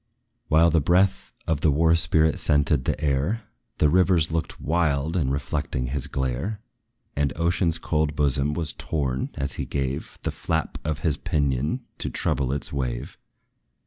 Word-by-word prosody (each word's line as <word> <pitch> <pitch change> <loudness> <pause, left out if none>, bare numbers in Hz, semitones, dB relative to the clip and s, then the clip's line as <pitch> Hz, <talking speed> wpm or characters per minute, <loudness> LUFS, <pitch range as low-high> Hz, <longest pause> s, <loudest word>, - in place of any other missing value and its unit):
While 80 +2 +5
the 80 0 +3
breath 95 +5 +2
of 80 -3 -1
the 80 - +4
war 80 +3 +3
spirit 80 -1 +3
scented 75 -2 +2
the - - -1
air, 75 +10 0 0.3
The 75 - +4
rivers 90 -1 +3
looked 80 0 -3
wild 80 -1 0
in 75 -7 +1
reflecting 70 -2 -2
his 65 +2 -2
glare; 65 - -2 0.6
And 70 -1 +1
ocean's 85 0 +1
cold 75 -2 -1
bosom 70 0 +1
was 80 -2 +1
torn, 65 -5 -2
as 70 -1 -2
he - - -3
gave 70 -1 -3
The - - -1
flap 80 -1 -2
of 75 -1 -2
his 75 -4 0
pinion 75 - -1 0.2
to - - -2
trouble 65 -2 0
its 70 +1 -2
wave. 60 -4 -4
75 Hz, 155 wpm, -25 LUFS, 70-80 Hz, 0.6 s, While